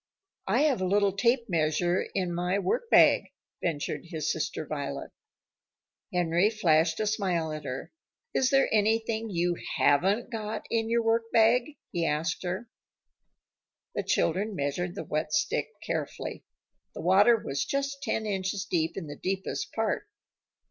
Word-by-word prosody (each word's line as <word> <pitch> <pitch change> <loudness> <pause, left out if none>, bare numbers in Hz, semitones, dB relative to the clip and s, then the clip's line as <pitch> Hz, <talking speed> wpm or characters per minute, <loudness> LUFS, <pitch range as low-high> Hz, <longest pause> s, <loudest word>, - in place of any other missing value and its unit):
"I 225 +8 +3
have 285 -9 +2
a 185 - +1
little 200 0 +2
tape 235 +3 +2
measure 175 0 +1
in 180 -3 0
my 180 +2 0
workbag," 200 - +4 0.3
ventured 150 -2 -2
his 160 -3 -2
sister 155 0 -3
Violet. 145 -2 -4 1.0
Henry 175 +2 +2
flashed 165 -6 +2
a 215 - +1
smile 185 -7 0
at 155 0 -6
her. 130 +1 -5 0.4
"Is 260 - +3
there 270 0 +4
anything 225 +1 +1
you 175 -2 0 0.2
haven't 195 - +3
got 220 -1 -4
in 225 -1 0
your 235 0 +2
workbag?" 230 +4 +3
he 170 - -1
asked 155 0 0
her. 185 +6 -3 1.3
The - - -1
children 200 +5 0
measured 175 +4 -2
the - - -4
wet 155 0 -2
stick 305 - +1 0.2
carefully. - - -4 0.5
The - - -5
water 200 +6 +5
was 135 -9 -2
just 275 0 -2
ten 220 -6 -1
inches 195 0 -2
deep 165 -3 -1
in 190 - -4
the 145 -1 -7
deepest 190 +1 -3
part. - - -1
190 Hz, 140 wpm, -28 LUFS, 165-225 Hz, 1.3 s, water